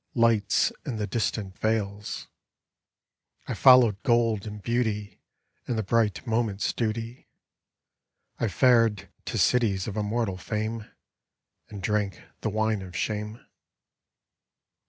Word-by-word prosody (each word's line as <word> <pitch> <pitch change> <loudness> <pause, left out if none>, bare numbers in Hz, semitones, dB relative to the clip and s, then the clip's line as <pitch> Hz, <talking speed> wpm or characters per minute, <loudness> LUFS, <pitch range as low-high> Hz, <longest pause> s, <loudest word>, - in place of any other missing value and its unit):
Lights 115 -4 +3
in 130 - -4
the 105 -1 -2
distant 105 -3 -2
vales; 105 -1 -2 1.2
I - - -2
followed 120 -6 +6
gold 115 -3 +2
and 105 0 -7
beauty. 105 -3 -2 0.5
And 120 - -1
the 110 - 0
bright 110 +1 +1
moment's 110 -3 0
duty; 115 +1 -3 1.1
I 115 - +1
fared 115 0 +3 0.2
to - - -3
cities 110 -6 +2
of 105 - -4
immortal 105 -2 -1
fame, 110 +3 -4 0.8
And 100 -2 -8
drank 105 -3 0 0.2
the - - -2
wine 110 -1 0
of 90 -1 -9
shame. 105 +2 -3
110 Hz, 115 wpm, -27 LUFS, 105-115 Hz, 1.2 s, followed